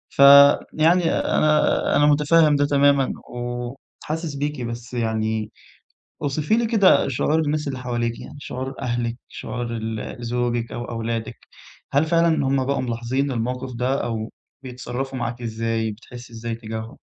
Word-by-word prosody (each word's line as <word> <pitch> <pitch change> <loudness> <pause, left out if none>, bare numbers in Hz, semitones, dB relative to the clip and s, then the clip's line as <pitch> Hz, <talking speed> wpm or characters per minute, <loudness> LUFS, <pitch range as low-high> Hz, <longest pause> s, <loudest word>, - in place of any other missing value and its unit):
ف - - -19 0.5
يعني 170 +3 +3
أنا 155 0 +2
أنا 145 - +4
متفهِّم 150 +1 +4
ده 145 - +2
تمامًا 140 -1 +3 0.2
وحاسس 125 +6 -5
بيكِ، 145 -1 -3
بس 120 +1 -6
يعني 110 -2 -1 0.7
اوصفي 145 +6 0
لي 235 - +1
كده 200 -10 +4
شعور 150 +4 +1
الناس 150 -1 -1
اللي 135 -2 -4
حواليكِ، 120 -2 -2
يعني - - -10
شعور 130 -1 -5
أهلِك، 120 -2 -2
شعور 120 +2 -5
ال 110 +2 -5
زوجِك 120 -1 -1
أو 120 - -5
أولادِك، 115 -1 -4 0.6
هل 145 +3 +3
فعلًا 165 -3 +2
هُم 135 -1 +1
بقوا 140 0 0
ملاحظين 125 +3 -2
الموقِف 125 +2 -3
ده 125 +3 0
أو 110 -1 -3 0.3
بيتصرّفوا 130 +1 -5
معاكِ 120 -1 -4
إزاي؟ 115 -1 -2
بتحسّي 120 +2 -12
إزاي 115 +1 -5
إتّجاهم؟ 110 +1 -6
125 Hz, 140 wpm, -22 LUFS, 115-145 Hz, 0.7 s, أنا